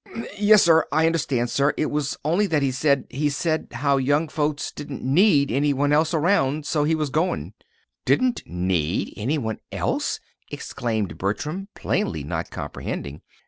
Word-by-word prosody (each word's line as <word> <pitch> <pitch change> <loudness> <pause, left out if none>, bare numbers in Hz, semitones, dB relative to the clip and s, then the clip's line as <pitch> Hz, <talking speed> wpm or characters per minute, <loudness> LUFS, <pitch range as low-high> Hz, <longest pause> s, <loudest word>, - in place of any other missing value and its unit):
"Yes, 205 0 +6
sir. 165 -1 +5
I 160 +2 +3
understand, 140 -7 0
sir. 140 +1 +2
It 155 - 0
was 145 -1 -1
only 180 +7 +2
that 155 -5 +1
he 135 - +1
said 140 0 +1
he 145 +3 0
said 155 +2 -1
as 120 - -8
how 140 -1 +3
young 145 +4 +1
folks 150 -1 -1
didn't 145 -3 -7
need 145 - +4
any 145 +4 +2
one 145 +2 +1
else 155 +2 +3
around. 155 -4 +1
So 150 -1 +1
he 160 +1 +2
was 155 -3 -2
goin'." 165 +6 -1 0.5
"Didn't 255 -1 +2
need 90 -1 -1
any 130 +9 -1
one 110 -5 -3
else!" - - -1 0.3
exclaimed 110 -5 -3
Bertram, 150 - -3
plainly - - -1
not - - -4
comprehending. 70 +1 -6
145 Hz, 165 wpm, -23 LUFS, 130-160 Hz, 0.5 s, Yes